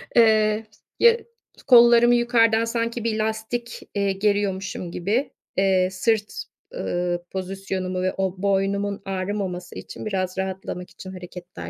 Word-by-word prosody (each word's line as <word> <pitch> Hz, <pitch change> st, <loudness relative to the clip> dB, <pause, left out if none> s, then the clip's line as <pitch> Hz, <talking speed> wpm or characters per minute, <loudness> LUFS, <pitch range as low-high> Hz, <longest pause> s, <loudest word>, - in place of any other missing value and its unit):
eee, 220 Hz, -1 st, +4 dB, 0.3 s
ya 470 Hz, 0 st, +6 dB, 0.5 s
kollarımı 240 Hz, -1 st, +7 dB
yukarıdan 230 Hz, -2 st, +3 dB
sanki 230 Hz, 0 st, -2 dB
bir 220 Hz, -1 st, -1 dB
lastik, 220 Hz, +2 st, -3 dB
eee, 200 Hz, -1 st, +1 dB
geriyormuşum 195 Hz, -3 st, -1 dB
gibi, 210 Hz, +11 st, -1 dB, 0.3 s
eee, 190 Hz, -1 st, +3 dB
sırt, 210 Hz, +2 st, -1 dB, 0.3 s
ııı, 175 Hz, -, -2 dB
pozisyonumu 190 Hz, -1 st, -3 dB
ve 185 Hz, -, 0 dB
o 190 Hz, -1 st, -2 dB
boynumun 200 Hz, +1 st, 0 dB
ağrımaması 185 Hz, -2 st, -3 dB
için -, -, -8 dB
biraz 185 Hz, -2 st, -2 dB
rahatlamak 190 Hz, -1 st, -4 dB
için 185 Hz, -, -10 dB
hareketler 180 Hz, 0 st, -9 dB
200 Hz, 120 wpm, -23 LUFS, 185-225 Hz, 0.5 s, kollarımı